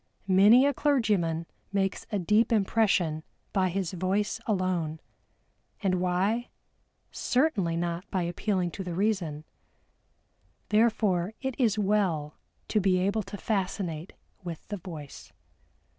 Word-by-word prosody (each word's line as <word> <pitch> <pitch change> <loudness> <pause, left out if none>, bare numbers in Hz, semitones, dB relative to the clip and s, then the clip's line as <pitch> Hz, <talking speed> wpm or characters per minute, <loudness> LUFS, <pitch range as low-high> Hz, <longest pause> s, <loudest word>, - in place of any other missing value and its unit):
Many 205 +7 +7
a 285 - +3
clergyman 205 - +1 0.3
makes 195 -1 -1
a 205 - +1
deep 210 +6 +2
impression 195 -7 +2 0.3
by 190 -2 +2
his 185 -1 -2
voice 195 +5 0
alone. 185 -6 0 0.8
And 185 -2 +1
why? 195 +7 0 0.6
Certainly 215 - +1
not 170 +2 -3
by 185 -2 0
appealing 180 +1 -1
to 190 - -6
the 175 -2 -4
reason. 180 -7 -1 1.3
Therefore 210 -3 +2
it 265 0 -2
is 220 -4 +3
well 190 -8 +1 0.3
to 215 - +2
be 190 -1 +3
able 200 +4 +1
to 200 0 -8
fascinate 185 -5 -2 0.3
with 170 -3 -7
the 205 - -3
voice. 160 -6 -9
190 Hz, 120 wpm, -28 LUFS, 175-210 Hz, 1.3 s, Many